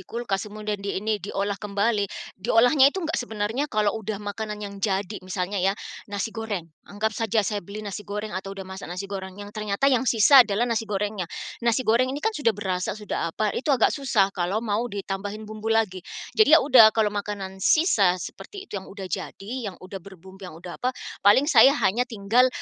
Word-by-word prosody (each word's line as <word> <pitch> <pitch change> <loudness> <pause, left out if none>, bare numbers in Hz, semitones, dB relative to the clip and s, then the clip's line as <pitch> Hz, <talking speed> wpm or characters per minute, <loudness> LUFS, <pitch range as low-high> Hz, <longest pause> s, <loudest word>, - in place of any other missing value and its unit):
kulkas, 220 -3 -3
kemudian 210 -1 -4
diini 205 +1 -2
diolah 200 +1 -3
kembali, 205 0 0 0.3
diolahnya 245 +6 +5
itu 360 +4 -4
nggak 320 - -1
sebenarnya 225 +5 -2
kalau 210 -3 +1
sudah 215 0 -4
makanan 210 +1 -5
yang 200 0 -8
jadi, 200 0 -1
misalnya 185 +1 -3
ya, 195 +3 +1 0.3
nasi 205 +2 -3
goreng. 220 -6 -4 0.2
Anggap 215 +2 -2
saja 220 -1 0
saya 205 0 -2
beli 205 +4 -8
nasi 200 +1 -5
goreng 210 +1 -5
atau 195 +1 -5
sudah 195 - -6
masak 190 +1 -8
nasi 180 +3 -5
goreng 190 -1 -6
yang 205 0 -9
ternyata 215 +6 +1
yang 255 0 +2
sisa 250 +4 +7
adalah 215 0 +2
nasi 230 -2 -1
gorengnya. 205 -3 -2 0.3
Nasi 235 +1 +1
goreng 235 +4 +3
ini 280 +3 -4
kan 445 - +2
sudah 235 - 0
berasa, 190 -1 -2
sudah 210 -5 -3
apa, 215 -1 0
itu 270 - -4
agak 265 -5 +4
susah 220 -9 +1
kalau 195 +5 -1
mau 220 +2 -1
ditambahin 200 +1 -5
bumbu 215 +1 -6
lagi. 220 -5 +1 0.3
Jadi 420 -8 +7
ya - - +2
sudah 255 -6 +8
kalau 215 -2 +2
makanan 200 -2 -5
sisa 200 - +4
seperti 390 - -8
itu 200 - -6
yang - - -13
sudah 195 -1 -8
jadi, 210 +6 -5
yang 185 - -9
sudah 190 +1 -9
berbumbu, 190 +1 -14
yang 160 - -11
sudah 175 +1 -9
apa, 255 +1 -1 0.2
paling 205 +7 +5
saya 275 -1 +6
hanya 240 +6 +2
tinggal, 230 +3 +3
210 Hz, 195 wpm, -25 LUFS, 195-230 Hz, 0.3 s, sudah